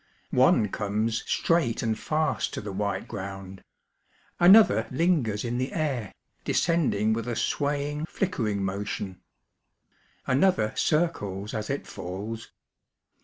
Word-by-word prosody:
One 105 - +4
comes 110 +4 -1
straight 165 -9 +1
imd 110 -2 0
fast 155 +6 -1
to - - -4
the 105 -1 -6
white 100 +1 -2
ground; 95 -2 -7 0.8
imother 180 - +6
lingers 130 - +1
in 120 +1 -2
the 130 - -2
air, 135 - -2 0.3
descending 130 - +1
with 115 +2 -3
a 120 - -2
swaying, 145 +4 -1
flickering 110 - -1
motion; 95 -1 -4 1.0
another 130 - +2
circles 105 - 0
as 110 -2 -3
it 140 - -2
falls. 105 +5 -6
115 Hz, 115 wpm, -27 LUFS, 105-150 Hz, 1.0 s, imother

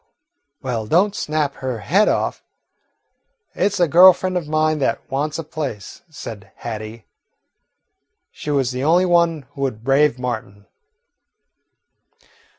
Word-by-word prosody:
"Well, 115 -4 -3
don't 190 - +3
snap 150 -2 -2
her 130 -4 -4
head 200 - +3
off. - - -1 1.1
It 205 - +1
's 200 - -4
a 175 - +4
girl 180 +4 +8
friend 185 0 -4
of 175 -4 -2
mine 155 0 +1
that 135 - +1
wants 150 +3 -1
a 165 - -4
place," 145 -10 -6
said 110 -9 -9
Hattie. 110 -1 -7 1.3
She - - -8
was 135 -3 +1
the 125 +1 -4
only 170 +5 +4
one 170 -4 +2
who 140 - -9
would 125 -5 -3
brave 135 0 +3
Martin. 110 -5 -5
145 Hz, 135 wpm, -20 LUFS, 120-165 Hz, 1.3 s, girl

